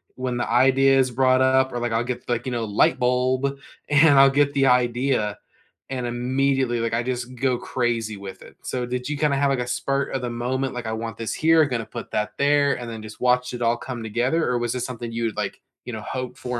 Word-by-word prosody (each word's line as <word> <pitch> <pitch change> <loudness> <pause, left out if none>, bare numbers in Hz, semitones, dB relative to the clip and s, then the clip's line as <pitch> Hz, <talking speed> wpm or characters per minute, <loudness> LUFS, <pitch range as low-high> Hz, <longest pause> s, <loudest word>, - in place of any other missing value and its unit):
when 130 -1 -3
the 120 - -2
idea 135 +2 +4
is 130 -1 +3
brought 130 +1 +3
up, 130 0 +3
or 120 - -3
like 120 -1 -2
I'll 115 +1 +1
get 125 0 -5
like, 120 +1 -1
you 130 - -3
know, 120 -2 -2
light 105 -1 +2
bulb, 130 +2 +1 0.3
and 145 -1 +6
I'll 135 0 +8
get 140 +1 +2
the 135 -1 +2
idea, 125 -3 +1 0.5
and 130 -2 -3
immediately, 130 +1 0
like, 115 -1 -2
I 120 +1 +1
just 125 0 -4
go 130 0 0
crazy 115 -4 -2
with 100 -1 -9
it. - - -15
So 125 -1 -3
did 125 +1 -4
you 150 -1 -3
kinda 145 -2 +1
have 140 0 +2
like 135 -2 0
a 120 - -4
spur 135 +3 -1
of 135 - -2
the 125 - -3
moment, 125 +3 -2
like, 120 -2 -5
"I 110 - -3
want 115 0 -4
this 115 - -3
here, 160 +1 +4
I'm 145 - -1
gonna 115 -4 -2
put - - -8
that 105 0 -2
there," 140 0 +3
and 120 -1 -7
then 110 -1 -7
just 110 0 -11
watch 125 0 +2
it 120 - -6
all 120 0 +2
come 120 -2 -6
together, 120 +9 0
or 125 - 0
was 120 0 -1
this 125 - -3
something 120 -2 -6
you 115 0 -3
would 110 - -3
like, 100 -2 -4 0.2
you 125 - -6
know, 110 - -5
hope 130 +2 -5
for 125 -1 -4
125 Hz, 250 wpm, -23 LUFS, 120-135 Hz, 0.5 s, I'll